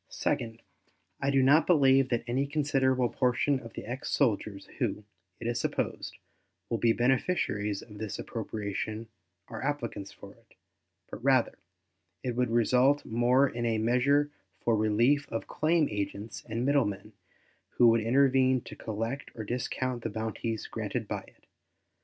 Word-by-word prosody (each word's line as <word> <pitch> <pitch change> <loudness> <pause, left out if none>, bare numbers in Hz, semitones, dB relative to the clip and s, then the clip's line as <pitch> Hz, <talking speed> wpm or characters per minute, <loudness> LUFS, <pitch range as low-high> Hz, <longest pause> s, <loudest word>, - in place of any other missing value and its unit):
Second, 115 -1 -2 0.6
I 140 - +1
do 135 -1 +3
not 145 +4 +5
believe 135 -5 +5
that 120 -2 0
any 130 +4 0
considerable 135 -4 +1
portion 130 +3 +1
of 115 -2 -11
the - - -7
ex 125 +4 -5
soldiers 105 -6 0
who, 105 - -1 0.4
it 115 - -8
is 120 0 -1
supposed, - - -3 0.5
will 115 - 0
be 115 - +4
beneficiaries 120 - 0
of 105 -3 -13
this 110 -2 -4
appropriation 110 +1 -4 0.4
are 110 -2 -7
applicants 130 -8 -3
for - - -13
it, - - -27 0.6
but, - - -8
rather, - - +3 0.7
it 125 -2 -2
would 125 -1 +1
result 125 +5 +3
more 125 +4 +3
in 120 -2 -4
a 115 -1 +1
measure 130 +6 +2 0.3
for 115 - +1
the 110 - +2
relief 120 +7 +2
of 115 - -3
claim 155 -1 +1
agents 105 +1 -4
and 115 +3 -2
middlemen 135 -9 0 0.6
who 120 - +7
would 115 0 +3
intervene 130 +1 +3
to - - -10
collect 115 +5 -4
or 110 - -5
discount 125 +2 -3
the 115 - -3
bounties 110 +1 -3
granted - - -4
by - - -3
it. - - -23
120 Hz, 150 wpm, -29 LUFS, 110-135 Hz, 0.7 s, who